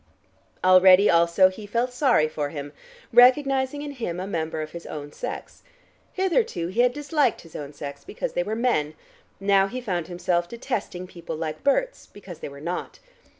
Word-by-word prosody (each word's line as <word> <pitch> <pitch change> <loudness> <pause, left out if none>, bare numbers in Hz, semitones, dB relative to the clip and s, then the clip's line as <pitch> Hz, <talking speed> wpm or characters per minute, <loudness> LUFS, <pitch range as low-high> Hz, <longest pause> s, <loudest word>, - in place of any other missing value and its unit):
Already 185 +2 +7
also 170 +3 +5
he 205 +2 -10
felt 240 +4 -1
sorry 250 - +3
for 150 -2 -3
him, 145 -1 -7 0.4
recognizing 265 +3 +4
in 290 - -5
him 225 -10 -4
a 185 - -3
member 160 -4 -3
of 155 - -9
his 170 0 -9
own 145 -1 -7
sex. - - -7 0.5
Hitherto 370 - 0
he 220 +6 +1
had 245 0 +4
disliked 295 -2 0
his 165 - -16
own 145 -1 -6
sex, 140 -1 -8
because - - -5
they - - 0
were 210 +5 -3
men, 190 -11 0 0.4
now 195 0 +3
he 250 +5 -5
found 180 -9 -3
himself 175 -1 -1
detesting 230 -7 -4
people 175 -3 -8
like 155 -1 -5
Berts, - - 0
because 190 -4 -12
they - - -6
were 140 0 -11
not. 170 +4 -5
185 Hz, 175 wpm, -24 LUFS, 165-245 Hz, 0.5 s, Already